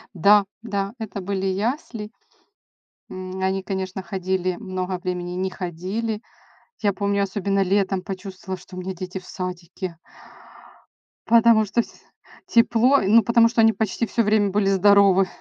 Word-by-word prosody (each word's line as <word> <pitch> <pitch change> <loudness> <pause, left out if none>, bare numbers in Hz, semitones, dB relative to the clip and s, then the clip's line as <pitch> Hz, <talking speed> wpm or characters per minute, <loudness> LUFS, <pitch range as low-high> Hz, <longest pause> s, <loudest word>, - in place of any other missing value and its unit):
Да, 200 +3 +5 0.2
да, 200 -2 -3
это 205 -3 -6
были 195 0 -2
ясли. 210 +2 -2 1.0
М, 185 0 -6
они, 190 0 0
конечно, 190 -1 -4
ходили 185 -1 -2
много 185 -3 -4
времени, 180 -1 -4
не 185 +1 -2
ходили. 190 +5 -4 0.6
Я 205 -2 +2
помню, 200 +1 0
особенно 195 0 -1
летом 195 0 +1
почувствовала, 190 -1 -7
что 185 - -13
у - - -5
меня 190 +1 -4
дети 185 +1 -6
в 185 - -18
садике. 180 0 -6 1.3
Потому 230 -1 +5
что 225 +4 +1
вс - - -14 0.5
тепло. 240 +4 +4
Ну 220 +4 +5
потому 235 +2 +5
что 230 -1 +2
они 225 0 +5
почти 220 +2 -1
всё 230 +1 0
время 210 -1 +2
были 200 0 +1
здоровы. 195 -1 +5
195 Hz, 145 wpm, -23 LUFS, 185-215 Hz, 1.3 s, Да